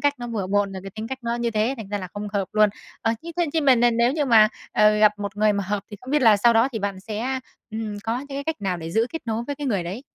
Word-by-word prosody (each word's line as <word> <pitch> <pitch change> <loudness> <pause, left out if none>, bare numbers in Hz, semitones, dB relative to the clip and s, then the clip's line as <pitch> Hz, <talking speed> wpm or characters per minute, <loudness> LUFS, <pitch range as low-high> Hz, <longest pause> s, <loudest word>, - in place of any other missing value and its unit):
cách 285 0 +2
nó 240 - -5
bừa 215 -5 -3
bộn 200 0 +1
là 190 - -6
cái 195 - -8
tính 220 +3 -6
cách 265 0 -4
nó 235 0 -1
như 240 -1 -1
thế 220 +4 0
thành 220 -5 -8
ra 205 0 -2
là 185 -2 -6
không 205 0 -4
hợp 195 -2 -1
luôn. 215 -1 +5 0.3
Ờ, 225 -1 +2
thế 335 0 -7
thế 345 -2 +2
thế 320 - +3
mà 270 -3 +5
n 235 - 0
n 240 -1 +3
nếu 240 +2 +3
như 300 -2 0
mà, 220 -4 +6 0.2
ờ, 210 0 +4
gặp 210 -1 +6
một 200 -1 -5
người 215 0 +3
mà 200 -1 -2
hợp 205 0 -2
thì 205 - -7
không 255 - -9
biết 295 -2 +2
là 220 -3 +7
sau 235 +4 +4
đó 230 +3 +4
thì 225 - -2
bạn 200 -2 -3
sẽ, 230 +6 -3 0.3
ừm, 215 -1 -4
có 230 +2 -1
những 280 - -9
cái 280 0 -5
cách 320 -9 -3
nào 190 -2 -1
để 165 -1 -6
giữ 225 +6 +2
kết 325 - -5
nối 225 0 -1
với 285 - -3
cái 290 - -4
người 200 -8 0
đấy? 195 +9 -5
220 Hz, 330 wpm, -23 LUFS, 205-250 Hz, 0.3 s, là